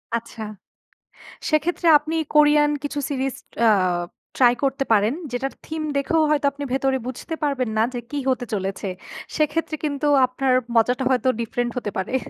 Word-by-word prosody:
আচ্ছা। 230 -1 -6 1.1
সেক্ষেত্রে 330 +3 0
আপনি 310 +2 -5 0.2
কোরিয়ান 295 0 +5
কিছু 290 0 -3
সিরিজ 270 -1 -1 0.3
আ - - +7 0.7
ট্রাই 245 -2 +5
করতে 270 0 0
পারেন। 215 +4 +3 0.2
যেটার 265 +2 -2
থিম 315 0 -4
দেখেও 320 +3 +1
হয়তো 290 -1 +2
আপনি 285 +1 -6
ভেতরে 270 0 +1
বুঝতে 260 +5 -5
পারবেন 275 -4 0
না 215 - +4
যে 245 - -2
কি 290 - -3
হতে 250 -1 -1
চলেছে। 195 0 -3 0.5
সেক্ষেত্রে 310 +1 0
কিন্তু 295 0 -1 0.2
আপনার 255 +1 0 0.2
মজাটা 245 +3 +2
হয়তো 260 0 +2
ডিফরেন্ট 240 +1 -2
হতে 210 - -3
পারে। 190 +7 -3
270 Hz, 150 wpm, -23 LUFS, 245-295 Hz, 1.1 s, আ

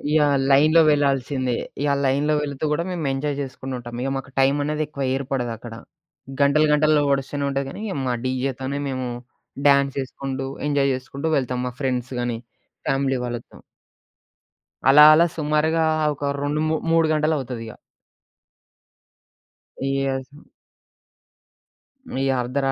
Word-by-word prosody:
Yeah! 145 -2 +4
లైన్‌లో 155 +4 +6
వెళ్ళాల్సిందే. 135 -3 +1 0.3
ఇగ 145 -1 +2
లైన్‌లో 140 +3 +2
వెళ్తూ 140 0 -4
కూడా 160 +3 0
మేం 180 -2 -3
ఎంజాయ్ 140 +1 -2
చేసుకుంటూ 135 -1 -6
ఉంటాం. 120 0 -8 0.2
మాకు 130 0 -8
టైమనేది 145 +3 +1
ఎక్కువ 140 -2 -5
ఏర్పడదక్కడ. 120 -4 -4 0.7
గంటలు, 140 +2 +4
గంటలు 150 0 +4
ఒడుస్తూనే 140 +1 -1
ఉంటది 140 0 -1
గానీ 205 - -8
ఇక 195 - -4
మా 125 - +1
డీజేతోనే 130 +1 -2
మేము 130 -1 -3 0.6
డ్యాన్సేసుకుంటూ, 135 -1 0 0.2
ఎంజాయ్ 140 -1 +2
చేసుకుంటూ 135 +4 -5
వెళ్తాం. 125 -2 -2
మా - - -3
ఫ్రెండ్స్‌గాని, 125 -2 -2 0.5
ఫ్యామిలీ 135 -1 +1
వాళ్ళతో. 120 -1 -7 1.3
అలా 145 +2 +9
అలా 165 +2 +5
సుమారుగా 155 +1 +1 0.3
ఒక 140 0 -2
రొండు 145 +2 -1
మూ 160 - +1 0.2
మూడు 165 -1 +4
గంటలవుతదిగ. 135 -7 -1 2.1
యెస్. 135 -1 -1 1.9
ఈ - - +1
అర్ధరా 135 +2 -1
135 Hz, 115 wpm, -23 LUFS, 130-150 Hz, 2.1 s, అలా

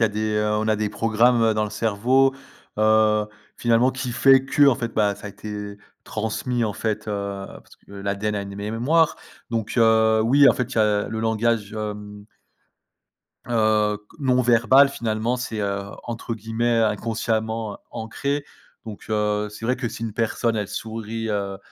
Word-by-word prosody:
y - - +7
a - - +3
des, 110 +1 -2
heu, 105 0 +1
on 110 +1 -1
a 110 - +3
des 105 0 -1
programmes 115 +1 +2
dans 110 - 0
le 105 - -3
cerveau, 120 +5 +2 0.4
heu, 110 0 +3 0.3
finalement, 120 +2 +2
qui 130 -1 -4
fait 135 +1 +5
que, 145 +1 +4
en 135 - +5
fait, 115 -3 -4
bah, 105 -2 +1
ça - - -10
a - - -5
été 105 0 -7 0.3
transmis 115 +2 -2
en 105 - -1
fait, 110 +1 -3
heu, 100 -1 -4
parce - - -14
que - - -19
l'ADN 100 +1 -3
a 100 - -2
une 100 0 -8
mé 105 +2 -4
mémoire 155 +8 +2 0.4
donc 115 -2 -2
heu, 110 -1 +4
oui, 140 +3 +6
en - - +6
fait, 125 +1 -3
il - - -9
y - - +3
a 105 -1 +2
le 110 0 -4
langage, 110 -1 0
hem 105 -1 -6 1.2
heu, 110 -3 +1
q 105 +7 -23
non 125 -2 +2
verbal. 125 +4 +5
Finalement, 115 -1 -2
c'est, 115 -3 -4
heu, 100 0 -2 0.2
entre 115 0 -5
guillemets 115 +2 -1
«inconsciemment 110 0 -1
ancré» 140 +6 -3 0.4
donc 110 -2 -9
heu, 105 0 0
c'est 105 +2 -9
vrai 125 +2 +2
que 125 -2 -3
si 115 - -6
une 110 - -4
personne, 115 +1 0
elle 105 -2 -2
sourit, 115 +1 -5
heu, 100 -2 -2
110 Hz, 180 wpm, -23 LUFS, 105-120 Hz, 1.2 s, y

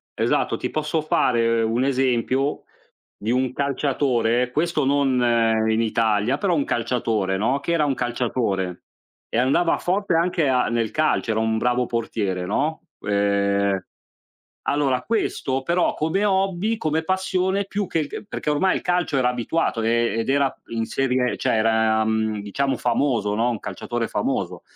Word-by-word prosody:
esatto, - - 0
ti - - -4
posso 155 +1 -1
fare 115 -6 +2
un 115 +3 +1
esempio, 130 +1 0 0.6
di 110 - -3
un 130 0 0
calciatore, 130 -4 0
questo 155 0 0
non 135 -2 +2 0.5
in 110 +1 +2
Italia, 110 +2 +1
però 185 -4 +1
un 145 - +1
calciatore, 110 -6 -1
no, 130 +7 +1
che 170 +4 -2
era 155 -3 +2
un 140 - +1
calciatore. 120 -7 -2 0.5
E - - -2
andava 135 +7 +2
forte 195 +1 -1
anche 165 -2 +1
a 125 -1 +2
nel 115 -1 0
calcio, 155 -6 +1
era 110 - 0
un 110 0 +1
bravo 125 +1 +1
portiere, 100 -6 -2
no. 150 - -1 0.2
Ehm, 100 -1 +1 0.8
allora 135 -3 +1
questo, 135 - -1
però 170 +5 +1
come 165 +7 0
hobby, 195 +2 +1
come 155 -3 -1
passione 190 +2 0
più 200 -1 -3
che 165 - -1
il 150 - -2
c - - -7
perché 150 - -4
ormai 165 +6 +2
il - - -2
calcio 175 -5 0
era 125 -1 +3
abituato, 125 0 -1
ehm, 115 0 +1
ed 115 - -2
era 140 -1 +2
in 115 -1 -2
serie 125 0 0
cioè - - 0
era, 110 0 +2
mhmm, 110 -1 0
diciamo 130 +6 -1
famoso, 120 -4 0
no, 115 +3 +1
un 115 -4 -3
calciatore 120 -1 -4
famoso. - - -2
125 Hz, 160 wpm, -23 LUFS, 115-150 Hz, 0.8 s, era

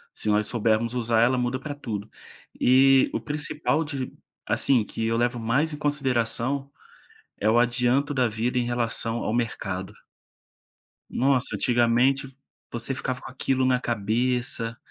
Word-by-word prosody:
Se - - -5
nós 105 0 +2
soubermos 115 0 0
usar, 115 -2 +2
ela 125 +2 +3
muda 125 +1 -1
pra 145 +2 -5
tudo. 110 -7 -6 0.5
E 135 +1 +5
o - - -2
principal 150 +1 -1
de 135 -4 -5 0.3
assim, 125 -5 +4
que 110 +2 -4
eu 115 - 0
levo 120 +1 0
mais 130 +8 +1
em - - -5
consideração, 135 -2 -1 0.7
é 105 - +2
o 115 - +4
adianto 125 +4 +1
da 130 -2 +2
vida 115 +3 -2
em 120 - +1
relação 120 -1 -1
ao 110 - -2
mercado. 95 -5 -3 1.2
Nossa, 135 0 +1
antigamente 120 +2 +2
v 135 - -15 0.4
você 120 +3 -4
ficava 130 0 -4
com - - -9
aquilo 130 0 0
na 130 -1 +2
cabeça 115 +1 -1
125 Hz, 150 wpm, -25 LUFS, 115-135 Hz, 1.2 s, E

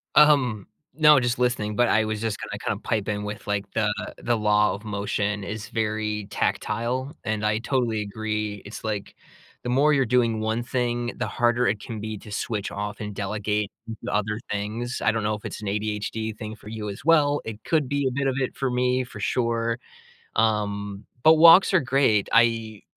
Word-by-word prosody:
Um, 135 -9 +5 0.3
no, 150 -2 +7
just 120 -1 0
listening, 120 -4 0
but 120 +1 +3
I 110 0 +3
was 110 -1 -3
just 115 -2 -1
gonna - - -5
kinda - - -2
pipe 105 -2 -1
in 105 -1 -2
with, 105 0 -6
like, 105 0 -1
the 110 -1 +1 0.3
the 120 -2 0
law 105 0 +3
of 105 +2 -8
motion 105 0 -2
is 105 +1 -5
very 105 -2 -2
tactile, 125 +7 -1
and 110 -1 -1
I 105 0 +2
totally 120 -3 0
agree. 105 0 -3
It's 100 - -8
like 105 -2 -4 0.5
the 120 - -3
more 140 +5 +4
you're 135 -2 +3
doing 115 -2 +2
1 110 +2 -1
thing, 120 -1 -1
the - - -2
harder 120 0 +2
it 110 - 0
can 110 -2 -6
be 110 0 -5
to 105 - -12
switch 105 -1 -3
off 105 +1 -4
and 105 -1 -5
delegate 105 +1 -1 0.3
the - - -3
other 105 +1 0
things. 110 +4 -3
I 110 - +4
don't 115 -1 -2
know 105 +1 +1
if 105 - -6
it's - - -6
an 105 - -5
ADHD 105 +2 -2
thing 110 -1 -6
for 105 - -12
you, 110 -1 -5
as 100 - -8
well; 145 -3 +4
it 110 -1 -7
could 155 -6 +1
be 140 -1 +1
a 130 - 0
bit 140 +2 -1
of 130 - 0
it 130 - -2
for 135 - -1
me, 125 +1 +1
for 120 -3 -10
sure. 115 +2 0 0.6
Um, 100 -2 0 0.2
but 160 +1 +8
walks 170 +5 +8
are 185 - +6
great. 130 -6 +2
I 115 -2 +2
110 Hz, 200 wpm, -25 LUFS, 105-125 Hz, 0.6 s, but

